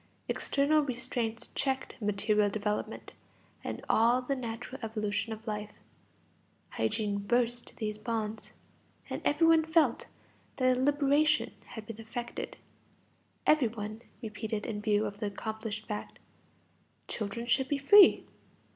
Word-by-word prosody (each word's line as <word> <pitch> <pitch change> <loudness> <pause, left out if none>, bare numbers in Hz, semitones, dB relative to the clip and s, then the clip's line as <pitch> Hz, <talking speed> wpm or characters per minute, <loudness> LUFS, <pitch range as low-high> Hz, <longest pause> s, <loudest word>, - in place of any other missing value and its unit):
External 290 +2 +2
restraints 240 -3 -3
checked 265 -1 -1
material 210 0 +2
development 210 +1 -3 0.5
and - - -5
all 235 +3 +4
the 255 +2 -2
natural 245 +1 -6
evolution 215 -1 -2
of 220 0 -7
life; 210 -1 -4 1.0
hygiene 200 - -1
burst 240 +3 0
these 215 -1 -3
bonds. 220 -1 -3 0.6
And - - -3
every 300 +3 +3
one 325 -1 +6
felt 320 -6 +2 0.5
that 255 -1 +4
a 250 - -1
liberation 290 +2 +3
had 220 -2 -9
been 225 0 -8
effected; 235 +2 -5 0.9
every 300 -5 +5
one 215 0 -6 0.2
repeated 215 0 -4
in 210 -2 -3
view 210 0 +2
of 205 -1 -5
the 210 - -1
accomplished 220 +1 -4
fact: 210 -1 -5 0.9
children 220 +2 -3
should 265 +2 +2
be 285 - 0
free. 385 +9 +7
225 Hz, 125 wpm, -31 LUFS, 210-260 Hz, 1.0 s, free